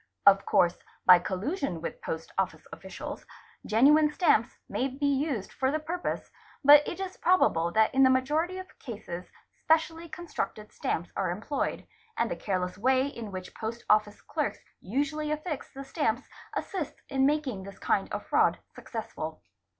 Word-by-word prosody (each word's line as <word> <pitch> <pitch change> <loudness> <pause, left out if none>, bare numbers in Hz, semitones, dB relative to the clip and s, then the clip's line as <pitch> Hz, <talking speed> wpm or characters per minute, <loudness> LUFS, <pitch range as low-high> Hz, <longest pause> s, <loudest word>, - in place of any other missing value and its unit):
Of 195 -1 +6
course, 175 -1 +3 0.3
by 180 -1 +9
collusion 190 - -2
with 165 - -6
post 160 0 -5
office - - -1
officials, - - -7 0.4
genuine 295 +8 +5
stamps 295 - +2
may 260 - -1
be 275 +2 -3
used 275 -6 0
for 265 0 +1
the 300 - +1
purpose, 335 +3 -4 0.3
but 290 +1 +10
it 350 - -4
is 380 -1 -5
probable 170 - +3
that 220 0 +4
in 270 - +4
the 260 - +7
majority 300 +8 +1
of 375 0 -10
cases 190 -7 -7 0.3
specially 325 +1 +1
constructed 300 -11 -5
stamps 170 +2 -2
are 190 - 0
employed, 220 +11 -2 0.3
and - - +1
the - - -1
careless 185 -1 -2
way 260 +3 +3
in 230 -6 -7
which 185 -1 -7
Post 230 +1 -5
Office 210 -1 +2
Clerks - - -2 0.2
usually 290 +8 -1
affix 305 -1 -3
the 275 - -8
stamps 270 -4 -1 0.3
assists 305 -7 -4
in 270 -1 +2
making 285 -9 0
this 195 0 -10
kind - - 0
of - - -4
fraud - - +3 0.2
success - - -7
ful. - - -6
265 Hz, 160 wpm, -29 LUFS, 205-305 Hz, 0.4 s, but